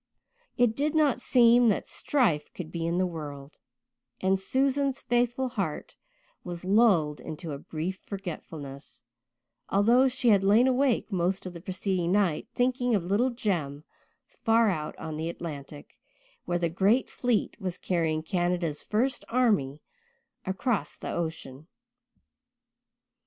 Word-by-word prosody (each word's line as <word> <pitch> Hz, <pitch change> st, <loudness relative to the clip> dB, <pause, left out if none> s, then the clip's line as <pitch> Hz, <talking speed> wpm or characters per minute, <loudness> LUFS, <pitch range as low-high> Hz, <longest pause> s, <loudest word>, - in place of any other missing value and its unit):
It 245 Hz, -2 st, +3 dB
did 295 Hz, +4 st, 0 dB
not 290 Hz, -5 st, +3 dB
seem 240 Hz, -2 st, +5 dB
that 205 Hz, -, 0 dB
strife 210 Hz, -, 0 dB
could 165 Hz, -3 st, -7 dB
be 165 Hz, -1 st, -3 dB
in 170 Hz, +1 st, 0 dB
the 185 Hz, -, +2 dB
world, 150 Hz, -4 st, -7 dB, 0.6 s
and 190 Hz, 0 st, +2 dB
Susan's 270 Hz, +5 st, 0 dB
faithful 245 Hz, +2 st, 0 dB
heart 195 Hz, -11 st, -4 dB, 0.5 s
was 175 Hz, 0 st, -6 dB
lulled 190 Hz, -8 st, +3 dB
into 160 Hz, +1 st, -7 dB
a 140 Hz, -, -5 dB
brief 165 Hz, +6 st, -5 dB
forgetfulness, 155 Hz, -, -8 dB, 0.7 s
although 235 Hz, +7 st, +4 dB
she 255 Hz, -1 st, +1 dB
had 200 Hz, -3 st, +5 dB
lain 210 Hz, +5 st, +5 dB
awake 260 Hz, -3 st, +1 dB
most 185 Hz, +1 st, 0 dB
of 185 Hz, -, -6 dB
the 170 Hz, -, -9 dB
preceding 185 Hz, -1 st, -1 dB
night 195 Hz, -7 st, +1 dB
thinking 245 Hz, -1 st, +1 dB
of 195 Hz, -, 0 dB
little 205 Hz, +8 st, +2 dB
Jem 170 Hz, -, -2 dB, 0.4 s
far 225 Hz, -1 st, +2 dB
out 155 Hz, -4 st, -4 dB
on 155 Hz, -1 st, -6 dB
the 160 Hz, +1 st, -2 dB
Atlantic, 150 Hz, -4 st, -8 dB, 0.5 s
where 175 Hz, -, 0 dB
the 170 Hz, -1 st, 0 dB
great 195 Hz, +9 st, +2 dB
fleet 235 Hz, -2 st, -1 dB
was 185 Hz, -2 st, -3 dB
carrying 160 Hz, -3 st, -1 dB
Canada's 175 Hz, -3 st, -1 dB
first 245 Hz, +5 st, -1 dB
army 205 Hz, -, +1 dB, 0.6 s
across 190 Hz, -, -1 dB
the -, -, -5 dB
ocean. 160 Hz, -4 st, -5 dB
190 Hz, 135 wpm, -28 LUFS, 160-240 Hz, 0.7 s, seem